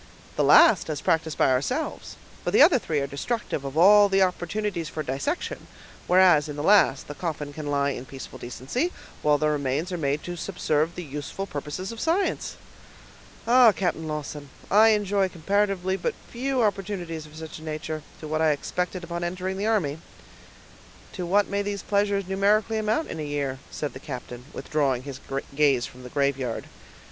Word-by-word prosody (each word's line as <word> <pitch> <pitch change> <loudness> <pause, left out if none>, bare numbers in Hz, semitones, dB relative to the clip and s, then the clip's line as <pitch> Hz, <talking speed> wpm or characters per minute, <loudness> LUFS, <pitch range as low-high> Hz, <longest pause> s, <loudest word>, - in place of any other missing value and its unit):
"The - - +1
last, 270 - +6
as 150 -2 -2
practiced 160 0 0
by - - +4
ourselves, 250 - -2 0.3
for - - -1
the - - +7
other 285 -8 +6
three 155 -8 -1
are - - 0
destructive 140 - -3
of 135 +2 -5
all 205 +4 +7
the 195 0 +4
opportunities 180 -1 -2
for 155 - -4
dissection; 135 - -3 0.4
whereas, 180 -5 +5
in 145 - -5
the 145 - -4
last, 195 -8 +4
the 145 - -6
coffin 150 -3 -4
can 150 0 -6
lie 140 0 +1
in 130 -1 -6
peaceful 135 +1 -9
decency, 135 - -3 0.3
while 150 -1 +3
the 155 - +1
remains 150 +3 -1
are 175 - -3
made 145 0 -1
to 175 - -5
subserve 165 -2 -1
the 180 - -5
useful 150 +6 -5
purposes 155 +4 -5
of 230 - -8
science. 340 - 0 0.9
Ah! 240 0 +7
Captain 175 -5 -2
Lawton, 150 -1 -5 0.2
I 215 +3 +7
enjoy 205 -3 +2
comparatively 190 +1 0
but 175 - -2 0.2
few 255 +1 0
opportunities 180 -6 -2
of 150 - -16
such 160 -1 -8
a - - -12
nature, 155 0 -4 0.2
to 155 - -6
what 155 +1 -1
I 155 -1 +4
expected 180 +4 -3
on 170 0 -3
entering 185 +2 -3
the 205 +2 -1
army." 165 -10 0 1.1
"To 180 -3 -4
what 200 +3 +3
may 200 0 -1
these 200 0 -4
pleasures 200 -1 +1
numerically 210 +3 +2
amount 220 +9 0
in 160 - -5
a - - -3
year?" 140 -3 -3
said 150 - -4
the 130 - -8
captain, 125 -3 -8
withdrawing 140 -5 -1
his 140 -1 -7 0.4
gaze 140 -4 +3
from 125 - -12
the 125 - -9
graveyard. 135 -3 -1
165 Hz, 180 wpm, -25 LUFS, 145-200 Hz, 1.1 s, the